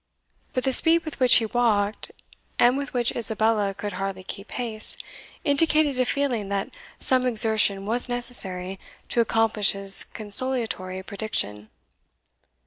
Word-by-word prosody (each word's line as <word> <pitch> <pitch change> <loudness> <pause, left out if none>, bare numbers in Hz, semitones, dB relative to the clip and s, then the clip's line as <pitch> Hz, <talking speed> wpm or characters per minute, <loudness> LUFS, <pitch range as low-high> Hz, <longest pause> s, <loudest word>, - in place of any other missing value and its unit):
But 255 - -2
the 265 - 0
speed 330 +5 +4
with 310 - -8
which 255 -2 +5
he 225 - +4
walked, 215 -3 -1 0.5
and 245 +1 +3
with 280 -1 -5
which 240 -2 +1
Isabella 220 -3 +1
could 205 0 -6
hardly 190 0 -5
keep 200 +2 -9
pace, 225 -3 -2 0.5
indicated 290 -1 +1
a 255 - +2
feeling 245 -7 -2
that 200 -1 -4 0.2
some 255 -1 +2
exertion 215 -4 +3
was 240 +4 +1
necessary 195 -7 -1 0.3
to 235 - +1
accomplish 225 -2 +2
his 195 0 +5
consolatory 210 -4 -2
prediction. 110 - -4
220 Hz, 135 wpm, -23 LUFS, 200-250 Hz, 0.5 s, which